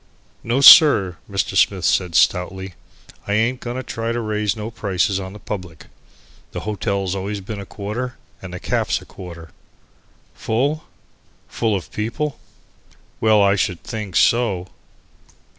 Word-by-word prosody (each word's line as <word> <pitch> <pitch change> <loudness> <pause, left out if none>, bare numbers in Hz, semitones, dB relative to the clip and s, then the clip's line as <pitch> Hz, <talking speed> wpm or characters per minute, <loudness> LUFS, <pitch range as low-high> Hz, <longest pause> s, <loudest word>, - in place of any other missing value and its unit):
"No, 120 +4 0
sir," 110 - +8
Mr. 100 -1 -2
Smith 95 -4 +2
said 90 -3 +1
stoutly, 95 +1 +1 0.5
"I 100 - 0
ain't 115 +4 +1
going 120 +1 -5
to 130 - -4
try 115 -1 -3
to 120 - -2
raise 105 -2 -1
no 110 +1 -6
prices 95 -3 -1
on 95 0 -7
the - - -9
public. 90 -6 -7 0.7
The - - -4
hotel's 100 -2 -2
always 100 +1 -3
been 100 +2 -7
a 100 - -8
quarter 120 +5 -5 0.3
and 95 - -8
the 90 - -6
caff's - - -1
a - - -15
quarter." 85 -3 -11 0.8
Full? 140 +8 -1 0.6
Full 110 -3 0
of 95 - -6
people? 135 +7 -3 0.8
Well, 110 -2 +4
I 100 0 +4
should 90 -3 -2
think 105 -6 -6
so! 100 -7 +2
105 Hz, 145 wpm, -20 LUFS, 95-115 Hz, 0.8 s, sir